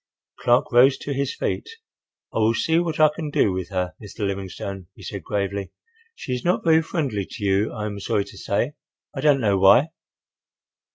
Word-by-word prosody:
Clark 120 +1 +2
rose 130 +3 +6
to 145 - -4
his 140 0 -2
feet. - - -3 0.6
"I - - -1
will 110 +1 +3
see 165 +6 +2
what 165 -3 -2
I 155 0 +7
can 155 -3 -4
do 105 - +2
with 95 -1 -4
her, 90 -4 -2
Mr. 105 0 -5
Livingstone," 95 -1 -5
he - - -14
said, - - -6
gravely. 100 -1 -3 0.4
"She 130 - -5
is 125 - -3
not 180 - +1
very 160 -1 +5
friendly 135 - -2
to 105 - -8
you, 100 +2 +2
I 105 -3 -4
am 100 -1 -4
sorry 100 0 0
to 100 - -13
say—I 135 +4 -4
don't 145 -2 +4
know 100 -3 +2
why." 100 - +6
110 Hz, 185 wpm, -23 LUFS, 100-145 Hz, 0.6 s, I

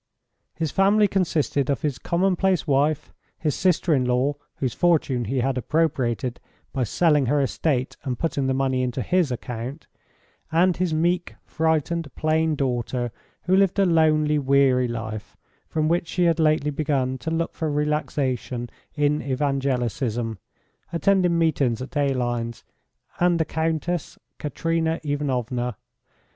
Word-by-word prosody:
His 160 -3 -2
family 205 +2 +4
consisted 155 -8 0
of 140 +3 -1
his 145 -4 -1
commonplace 185 0 +1
wife, 145 0 +1 0.2
his 150 -3 -1
sister 180 -2 +2
in 130 -3 +2
law, 125 +3 +1 0.2
whose 130 -4 -2
fortune 150 -8 +2
he 130 +4 -1
had 130 0 0
appropriated 130 -4 0 0.3
by 130 -2 0
selling 150 - +2
her 145 +3 +2
estate 135 -1 -1
and 130 -4 -2
putting 140 -5 -1
the 130 - +1
money 130 -1 +1
to 125 +1 -4
his 175 - +1
account, 125 +4 -5 0.7
and 175 +2 +3
his 180 -1 0
meek, 175 +3 0
frightened, 160 0 0
plain 155 0 +1
daughter, 125 -2 -1 0.3
who 185 +2 +2
lived 195 -1 +3
a 200 - +4
lonely, 155 -3 +3
weary 135 -2 +3
life, 110 -2 -6 0.3
from 155 -1 0
which 170 +1 +1
she 180 - 0
had 165 -1 +3
lately 155 -2 +2
begun 135 -3 -1
to 160 - -4
look 165 +1 -1
for 160 - -2
relaxation 135 -5 -1 0.2
in 150 0 +1
evangelicism, 125 -5 -1 0.5
attending 180 0 +2
meetings 140 -8 +1
at 130 +4 -8
Aline's, 120 -5 -1 0.6
and 175 -1 +3
the 160 - +2
Countess 160 +2 -2 0.2
Katerina 165 +2 -1
Ivanovna. 125 -5 -2
145 Hz, 135 wpm, -24 LUFS, 130-165 Hz, 0.7 s, family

